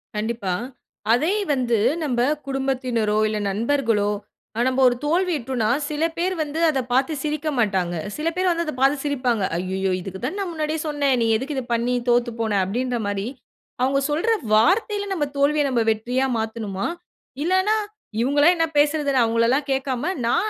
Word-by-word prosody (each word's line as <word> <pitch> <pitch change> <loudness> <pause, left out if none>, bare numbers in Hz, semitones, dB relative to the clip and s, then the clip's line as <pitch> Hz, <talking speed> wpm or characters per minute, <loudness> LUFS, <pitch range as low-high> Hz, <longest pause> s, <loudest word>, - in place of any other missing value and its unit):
கண்டிப்பா. 215 -3 -2 0.6
அதே 315 - +2 0.2
வந்து 240 -4 +1 0.3
நம்ப 245 -5 0 0.3
குடும்பத்தினரோ, 255 -5 0
இல்ல 215 0 -2
நண்பர்களோ 225 -2 +1 0.6
நம்ப 260 +1 +1
ஒரு 245 - +3
தோல்வியுற்றோனா 295 - 0 0.2
சில 300 +1 -2
பேர் 365 +2 0
வந்து 310 +1 -3
அத 275 -5 +1
பார்த்து 265 +5 +2
சிரிக்க 305 0 -2
மாட்டாங்க. 190 -6 +1 0.2
சில 305 +2 -2
பேர் 370 +1 +1
வந்து 340 0 +1
அத 305 - -3
பார்த்து 275 +2 +4
சிரிப்பாங்க. 255 -6 0
"அய்யய்யோ! 190 +2 -1
இதுக்கு 190 +1 -7
தான 380 +10 -3
நா 395 - 0
முன்னாடியே 310 -1 -2
சொன்னே 290 -2 0
நீ - - +2
எதுக்கு 275 +4 -4
இத 265 - -2
பண்ணி 235 +2 0 0.2
தோத்து 240 0 +3
போன?" 225 -1 0
அப்டின்ற 245 +5 -1
மாரி 200 0 -2 0.6
அவங்க 270 +2 +2
சொல்ற 320 +10 0 0.2
வார்த்தையில 405 - +3
நம்ம 315 -6 0
தோல்விய 295 +1 +3
நம்ம 240 -3 +1
வெற்றியா 245 +4 0
மாத்தனுமா? 220 -3 -3 0.6
இல்லனா. 375 +5 +2 0.5
இவங்களே 290 +5 +4
என்ன 330 -1 +1
பேசுரது 290 -1 +2
"நா 250 - +5
அவங்கள 230 0 +2
எல்லா 270 +3 +3
கேட்காம 270 +5 -1
நா 235 - +2
265 Hz, 160 wpm, -23 LUFS, 230-300 Hz, 0.6 s, நா